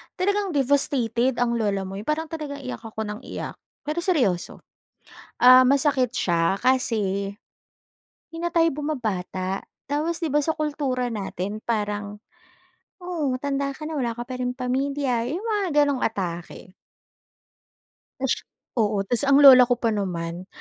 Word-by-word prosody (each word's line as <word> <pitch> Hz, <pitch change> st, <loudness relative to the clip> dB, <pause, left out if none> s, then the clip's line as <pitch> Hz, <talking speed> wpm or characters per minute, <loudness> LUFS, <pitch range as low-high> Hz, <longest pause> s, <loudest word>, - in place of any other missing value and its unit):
talagang 400 Hz, -2 st, 0 dB
devastated 265 Hz, -3 st, +1 dB
ang 235 Hz, -1 st, +1 dB
lola 200 Hz, -3 st, 0 dB
mo 190 Hz, +1 st, -6 dB
'yung 210 Hz, -, -10 dB
parang 310 Hz, +1 st, -1 dB
talagang 290 Hz, -3 st, -6 dB
iyak 255 Hz, -, -5 dB
ako 220 Hz, -1 st, -5 dB
nang 210 Hz, 0 st, -5 dB
iyak. -, -, -6 dB, 0.3 s
Pero 305 Hz, +3 st, -2 dB
seryoso, 260 Hz, -, 0 dB, 0.7 s
ah, 255 Hz, +1 st, +8 dB
masakit 275 Hz, -2 st, +3 dB
siya 170 Hz, -4 st, +1 dB
kasi, 200 Hz, -6 st, 0 dB, 1.0 s
hindi 330 Hz, -, -10 dB
na 345 Hz, -, 0 dB
tayo 330 Hz, -1 st, +4 dB
bumabata. 205 Hz, -, -3 dB, 0.2 s
Tapos 320 Hz, +4 st, -1 dB
'di 325 Hz, -, 0 dB
ba 295 Hz, -, +3 dB
sa 315 Hz, +2 st, 0 dB
kultura 285 Hz, -5 st, -1 dB
natin 205 Hz, -1 st, -4 dB
parang, 210 Hz, -2 st, -2 dB, 0.8 s
"Oh 335 Hz, -7 st, -2 dB
matanda 275 Hz, +1 st, -2 dB
ka 305 Hz, -, -13 dB
na 315 Hz, -2 st, -3 dB
wala 240 Hz, -3 st, -1 dB
ka 240 Hz, -, -4 dB
pa 255 Hz, -1 st, -5 dB
ring 250 Hz, 0 st, -1 dB
pamilya." 260 Hz, -1 st, -1 dB
'Yong 335 Hz, +9 st, -3 dB
mga 420 Hz, -4 st, 0 dB, 0.2 s
gano'ng 285 Hz, -3 st, -1 dB
atake. 180 Hz, -4 st, -4 dB, 1.5 s
Ush 265 Hz, -1 st, -1 dB, 0.4 s
Oo, 210 Hz, -2 st, +2 dB
ta's 240 Hz, +4 st, 0 dB
ang 275 Hz, 0 st, +6 dB
lola 260 Hz, -3 st, +10 dB
ko 245 Hz, -, +2 dB
pa 230 Hz, -2 st, +1 dB
naman, 180 Hz, -4 st, -3 dB
255 Hz, 145 wpm, -24 LUFS, 210-290 Hz, 1.5 s, lola